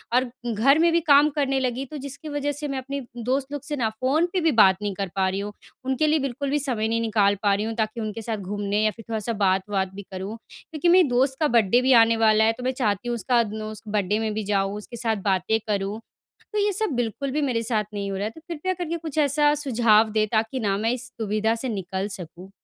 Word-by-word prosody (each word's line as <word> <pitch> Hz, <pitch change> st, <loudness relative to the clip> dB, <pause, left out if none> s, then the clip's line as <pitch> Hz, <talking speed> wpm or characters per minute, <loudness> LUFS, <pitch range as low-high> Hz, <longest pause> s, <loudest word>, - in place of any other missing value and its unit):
और 255 Hz, -, +4 dB, 0.3 s
घर 275 Hz, +8 st, +4 dB
में 335 Hz, 0 st, +4 dB
भी 335 Hz, -, +3 dB
काम 295 Hz, -1 st, +5 dB
करने 270 Hz, -2 st, +1 dB
लगी 255 Hz, +1 st, -2 dB
तो 300 Hz, -, -8 dB
जिसकी 285 Hz, +3 st, -7 dB
वज़ह 290 Hz, 0 st, -1 dB
से 290 Hz, +1 st, -4 dB
मैं 275 Hz, -1 st, -3 dB
अपने 275 Hz, +2 st, -4 dB, 0.3 s
दोस्त 265 Hz, +2 st, -1 dB
लोग 290 Hz, -, -4 dB
से 295 Hz, 0 st, -3 dB
ना 230 Hz, -5 st, 0 dB
फ़ोन 260 Hz, +9 st, +1 dB
पे 370 Hz, -, +2 dB
भी 325 Hz, -1 st, +3 dB
बात 190 Hz, -2 st, +7 dB
नहीं 205 Hz, -1 st, -2 dB
कर 195 Hz, 0 st, -3 dB
पा 190 Hz, -1 st, +2 dB
रही 195 Hz, +1 st, -2 dB
हूँ। 205 Hz, +1 st, -5 dB, 0.3 s
उनके 265 Hz, +4 st, +1 dB
लिए 310 Hz, 0 st, +3 dB
बिल्कुल 275 Hz, +1 st, -3 dB
भी 295 Hz, +1 st, +1 dB
समय 240 Hz, -6 st, 0 dB
नहीं 230 Hz, +1 st, 0 dB
निकाल 210 Hz, -3 st, +2 dB
पा 200 Hz, -1 st, +4 dB
रही 205 Hz, +2 st, -1 dB
हूँ 225 Hz, -, -3 dB
ताकि 220 Hz, +1 st, -2 dB
उनके 215 Hz, +1 st, -4 dB
साथ 220 Hz, -1 st, -3 dB
घूमने 205 Hz, +2 st, -2 dB
या 215 Hz, -, +3 dB
फ़िर 225 Hz, -1 st, -13 dB
थोड़ा-सा 225 Hz, +1 st, -2 dB
बात-वात 195 Hz, -1 st, 0 dB
भी 200 Hz, -, -7 dB
करूँ। 190 Hz, +4 st, -5 dB
क्योंकि 315 Hz, +2 st, -4 dB
मेरे 360 Hz, -3 st, +6 dB
दोस्त 265 Hz, +2 st, +1 dB
का 310 Hz, -, +3 dB
बर्थडे 225 Hz, +3 st, +4 dB
भी 260 Hz, 0 st, +4 dB
आने 225 Hz, 0 st, +1 dB
वाला 220 Hz, -1 st, +4 dB
है 225 Hz, -, +3 dB
तो 250 Hz, -, -7 dB
मैं 255 Hz, -, +1 dB
चाहती 205 Hz, +1 st, 0 dB
हूँ 240 Hz, -, 0 dB
उसका 235 Hz, +2 st, +2 dB
न 220 Hz, -, -5 dB
उस 215 Hz, -1 st, -7 dB
बर्थडे 205 Hz, 0 st, 0 dB
में 220 Hz, -1 st, -1 dB
भी 215 Hz, 0 st, -3 dB
जाऊँ, 195 Hz, 0 st, 0 dB
उसके 235 Hz, +3 st, -8 dB
साथ 225 Hz, -1 st, 0 dB
बातें 200 Hz, +3 st, +1 dB
करूँ। 200 Hz, +1 st, -2 dB, 0.5 s
तो 425 Hz, -, 0 dB
ये 410 Hz, 0 st, +2 dB
सब 430 Hz, -3 st, 0 dB
बिल्कुल 245 Hz, +3 st, -2 dB
भी 300 Hz, +2 st, -1 dB
मेरे 240 Hz, -5 st, 0 dB
साथ 220 Hz, -2 st, 0 dB
नहीं 200 Hz, -1 st, -3 dB
हो 195 Hz, -, -3 dB
रहा 200 Hz, -, -2 dB
है 220 Hz, -, -3 dB
तो 320 Hz, -, -15 dB
कृपया 345 Hz, +2 st, -2 dB
करके 340 Hz, -2 st, -3 dB
कुछ 315 Hz, -3 st, -7 dB
ऐसा 295 Hz, 0 st, +3 dB
सुझाव 230 Hz, -6 st, +3 dB
दें 215 Hz, 0 st, +1 dB
ताकि 225 Hz, +3 st, 0 dB
ना 200 Hz, -3 st, 0 dB
मैं 225 Hz, +3 st, 0 dB
इस 255 Hz, +1 st, -6 dB
दुविधा 215 Hz, +1 st, 0 dB
से 250 Hz, +2 st, -3 dB
निकल 190 Hz, -1 st, -3 dB
सकूँ। 185 Hz, -1 st, -9 dB
230 Hz, 255 wpm, -24 LUFS, 210-275 Hz, 0.5 s, बात